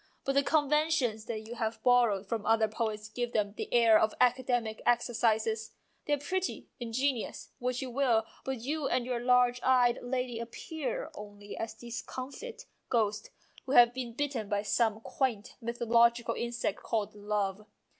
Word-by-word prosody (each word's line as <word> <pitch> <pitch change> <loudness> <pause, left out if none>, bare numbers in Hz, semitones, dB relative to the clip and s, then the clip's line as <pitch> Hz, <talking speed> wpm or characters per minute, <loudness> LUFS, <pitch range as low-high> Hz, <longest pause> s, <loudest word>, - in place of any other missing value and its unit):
But 275 - +1
the 280 - +4
conventions 295 -6 +1
that 225 -2 -4
you 230 - -7
have 225 -1 -3
borrowed 235 -6 +4
from 220 +1 -3
other 225 0 +3
poets 215 -1 -3
give 240 +2 -4
them 205 -2 0
the - - -6
air 230 -2 +6
of 215 0 +1
academic 245 -3 +1
exercises: 225 -2 +1 0.3
they 295 - +1
are - - +3
pretty, 370 +7 -3
in 235 -2 -5
genious, 260 -1 -1
what 250 +1 -1
you 255 - -5
will, 240 -4 +2 0.2
but 265 -3 -3
you 290 +3 -2
and 250 - 0
your 250 -1 -1
large 250 0 +3
eyed 250 -2 +4
lady 250 -1 -2
appear 315 - -5
only 205 0 -9
as 225 - -5
discomfited 265 - -7 0.3
ghosts 215 -3 0 0.4
who 265 - -1
have 240 -3 +7
been 245 -2 -5
bitten 250 -5 -2
by 205 0 0
some 220 0 +1
quaint 235 -4 -2
mythological 235 0 +2
insect 235 0 -2
called 215 -3 -2
love. 205 -1 -2
235 Hz, 160 wpm, -31 LUFS, 220-255 Hz, 0.4 s, have